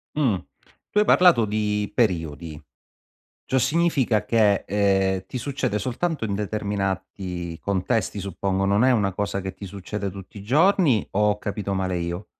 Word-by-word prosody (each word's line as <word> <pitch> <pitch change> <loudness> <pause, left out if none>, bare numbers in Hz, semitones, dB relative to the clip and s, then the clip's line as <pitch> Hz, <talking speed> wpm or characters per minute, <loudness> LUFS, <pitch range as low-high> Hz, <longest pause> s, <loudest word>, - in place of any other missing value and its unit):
Mh, 130 -10 +2 0.6
tu 210 - +2
hai 210 - +4
parlato 175 - +5
di 105 0 -1
periodi, 80 - -1 0.8
ciò 130 - +1
significa 135 -7 +1
che, 105 -3 +3
ehm, 95 -1 +1
ti 125 - -5
succede 135 -4 -2
soltanto 130 - -2
in 100 - -2
determinati 95 -4 -3
contesti 100 +2 -1
suppongo 95 0 -2
non 100 +4 +3
è 130 - +5
una 100 -6 +1
cosa 100 +1 -2
che 95 -1 -5
ti 100 - -9
succede 100 +1 -5
tutti 100 +2 -11
i 100 - -10
giorni 150 - +3
o 105 +1 +2
ho 105 - 0
capito 100 -1 -4
male 95 -1 -1
io? 85 +3 -4
100 Hz, 155 wpm, -24 LUFS, 95-115 Hz, 0.8 s, parlato